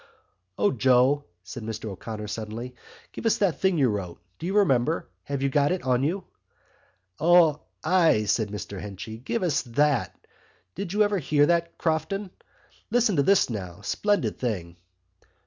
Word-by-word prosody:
"O, 100 0 +3
Joe," 130 +3 +3 0.2
said 120 - -8
Mr 110 0 -5
O'Connor 105 +2 -6
suddenly. 110 +4 -6 0.4
"Give - - -3
us 225 - +3
that 195 -5 +1
thing 190 -2 +2
you 135 -4 +4
wrote—do 90 - -6
you 195 +3 0
remember? 130 - +2 0.2
Have 140 -1 -3
you 140 - +2
got 145 +2 +2
it 185 - -2
on 125 -1 +2
you?" 175 +7 -1 1.0
"O, 165 -2 +5 0.2
ay!" 165 -9 +4
said 105 0 0
Mr 100 -2 -6
Henchy. 105 +2 -7
"Give 185 - -2
us 170 -6 +1
that. 140 +1 +1 0.6
Did 200 -3 -5
you 210 +2 +3
ever 205 -2 +1
hear 145 -1 +3
that, 170 +1 0
Crofton? 185 +5 -1 0.6
Listen 235 -5 +2
to - - +5
this 195 +7 +4
now: 95 -5 -6
splendid 205 - 0
thing." 90 -9 -3
140 Hz, 155 wpm, -26 LUFS, 110-175 Hz, 1.0 s, O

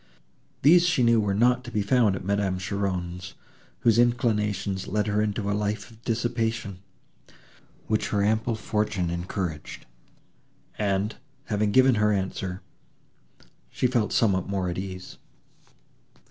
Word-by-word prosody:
These 170 +5 +6
she 175 -8 +2
knew 115 -1 +4
were 100 -2 0
not 125 +3 +3
to 120 - -8
be 105 -3 -1
found 110 -2 +3
at 90 - -7
Madame 100 -1 0
Cheron's, 90 -1 -3 0.5
whose 115 -2 +4
inclinations 105 -5 +1
led 105 0 0
her 105 0 +1
into 105 -1 -1
a 100 - +1
life 105 +1 -2
of 115 +1 -19
dissipation, 115 -4 -2 1.1
which 110 0 0
her 100 -1 0
ample 110 +2 +1
fortune 105 -5 -1
encouraged; 85 -2 -4 0.9
and, 100 0 0 0.3
having 105 -1 0
given 130 +3 +5
her 105 0 +4
answer, 95 -1 -3 1.1
she - - -2
felt 120 -4 +1
somewhat 95 -5 +2
more 95 -2 -1
at 85 - -4
ease. 95 -1 -7
105 Hz, 130 wpm, -26 LUFS, 95-115 Hz, 1.1 s, These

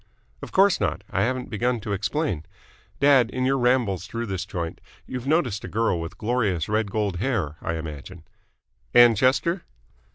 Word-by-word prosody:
"Of - - -8
course 195 -1 +4
not. 90 -7 -1
I - - 0
haven't 130 +1 -1
begun 120 +3 0
to 105 -3 -3
explain. 105 - -1 0.6
Dad, 135 -4 +5
in 130 +1 -2
your 135 +1 +2
rambles 120 -7 +1
through 115 +2 -4
this 95 -3 -4
joint 85 -5 -5 0.2
you've 125 0 -6
noticed 140 - +1
a - - -5
girl 110 -6 0
with 85 +2 -7
glorious 105 -8 0
red 105 0 0
gold 100 -3 -1
hair, 95 - -1
I 85 - -2
imagine?" 80 +2 -7 0.7
"Ann 120 -1 +8
Chester?" 140 - +1
110 Hz, 165 wpm, -24 LUFS, 95-130 Hz, 0.7 s, Ann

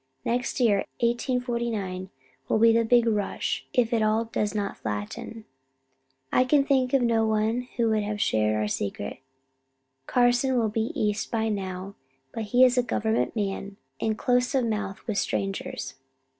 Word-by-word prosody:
Next 245 +3 -1
year, 225 -5 +4 0.2
1849, 235 -6 -1 0.4
will - - +3
be 225 +1 +6
the 230 0 +3
big 235 +1 +4
rush, 210 -3 -1
if 240 -2 +1
it 230 - +2
all 215 +1 +2
does 215 -2 -2
not 200 -1 -3
flatten. 105 - -5 0.9
I 255 - +5
can 275 +2 +3
think 260 -3 +2
of 265 - +3
no 230 -2 +2
one 220 +3 0
who 230 -2 +2
can 215 - +2
have 210 0 -3
shared 110 - +2
our 105 0 0
secret. 100 -1 -4 0.9
Carson 245 +1 +3
will 225 -2 +2
be 220 +2 -1
East 210 0 0
by 225 -1 0
now, 190 -1 -4 0.4
but 225 - -4
he 250 +4 +5
is 250 0 +3
a - - +5
government 225 -2 -1
man, 200 -1 -3 0.2
and 220 -1 -1
close 250 +3 +1
of 260 -3 +2
mouth 210 -3 -3
with 215 -4 -1
strangers. 195 -8 -3
225 Hz, 160 wpm, -26 LUFS, 205-245 Hz, 0.9 s, be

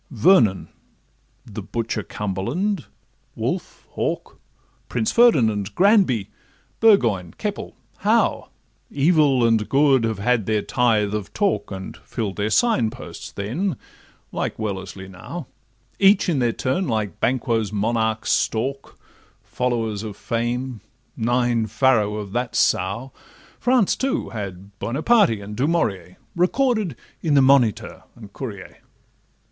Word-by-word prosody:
Vernon, 115 - +3 0.8
the - - -7
butcher 115 -2 -3
Cumberland, 115 - -3 0.5
Wolfe, - - -4
Hawke, - - -3 0.5
Prince 115 -3 0
Ferdinand, 115 - +3
Granby, 180 - +3 0.5
Burgoyne, 115 - +3
Keppel, - - -4 0.2
Howe, - - +1 0.4
Evil 145 -4 +3
and 115 -2 +2
good, 135 -3 +4
have 110 -2 -2
had 115 0 +1
their 110 -1 +1
tithe 110 -4 +1
of 105 -2 -4
talk, 205 -2 0
And 95 -1 -7
fill'd 105 -5 -5
their 105 +1 0
sign 130 - +2
posts - - -9
then, 145 - -3 0.5
like - - -3
Wellesley 95 -2 -5
now; 95 - -8 0.5
Each 200 +1 +5
in 160 -6 +1
their 120 -2 +2
turn 130 +10 -1
like 110 -7 -2
Banquo's 115 -4 0
monarchs 110 +1 0
stalk, 135 +5 -1 0.5
Followers 115 -4 -2
of 105 -2 -7
fame, 120 0 -3 0.3
'nine 120 -1 +1
farrow' 110 -2 +2
of 105 -2 -6
that 120 +2 -2
sow: 100 +9 +1 0.5
France, 245 -5 +3
too, 270 +3 -2
had 100 -2 -8
Buonaparte 145 - +2
and 100 +1 -8
Dumourier 105 - -1 0.2
Recorded 215 - +1 0.3
in 155 -3 +1
the 140 - +6
Moniteur 130 -5 +2
and 105 -4 -13
Courier. 100 -8 -8
115 Hz, 120 wpm, -22 LUFS, 105-140 Hz, 0.8 s, the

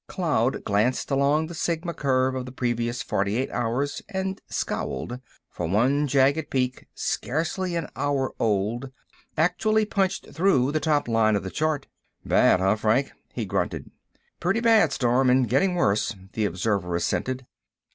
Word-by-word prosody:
Cloud 145 - 0
glanced 105 +8 0
along 140 +3 +2
the 170 - -8
Sigma 170 +1 -2
curve 130 -3 +1
of 130 -1 -4
the - - -7
previous 120 -2 -2
forty 100 +3 -1
eight 130 - -1
hours 125 +4 -1
and 190 -1 -3
scowled, 120 +1 -3 0.3
for 85 - -4
one 130 - +2
jagged 140 +3 +2
peak, 130 -1 -1
scarcely 170 +5 -2
an 165 -2 -2
hour 140 -2 -1
old, 115 +5 0 0.5
actually 215 +7 +2
punched 195 -2 -1
through 145 -6 +3
the 155 - 0
top 150 -2 +1
line 110 -2 +3
of 100 - -1
the 95 - -5
chart. 155 -2 -1 0.4
"Bad, - - +4
huh, 95 +3 +2
Frank?" 115 +6 +1 0.2
he - - -3
grunted. - - -2 0.5
"Plenty 180 +6 +1
bad, 225 - +5
Storm, 125 0 +2
and 125 -1 +4
getting 180 - +2
worse," 105 - +1 0.2
the 110 - 0
observer 90 -1 -1
assented. 130 +8 -1
130 Hz, 150 wpm, -25 LUFS, 115-160 Hz, 0.5 s, bad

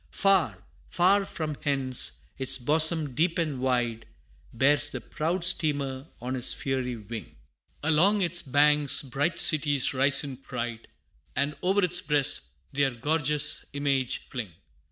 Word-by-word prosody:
Far, 195 -3 +1 0.3
far 195 +3 +3
from 155 -6 -5
hence, 135 -3 -1 0.2
its 130 -1 +4
bosom 155 +2 +2
deep 165 +6 +1
and 155 -6 -1
wide, 120 -3 -1 0.4
Bears 145 +4 +3
the - - -5
proud 170 +3 -3
steamer 140 -5 0
on 125 +2 -4
its 125 -1 -1
fiery 130 -2 -2
wing 110 0 -8 0.5
Along 175 +7 +3
its 175 0 -1
banks, 145 +1 +3
bright 145 +6 -2
cities 145 -4 +2
rise 135 +1 +3
in 135 -3 -6
pride, 120 -3 -6 0.5
And 140 +1 0
o'er 195 +2 +2
its 180 0 +1
breast 145 -2 0 0.3
their 140 0 +2
gorgeous 150 +4 -1
image 140 -3 -1
fling. 115 - -6
145 Hz, 135 wpm, -27 LUFS, 130-160 Hz, 0.5 s, its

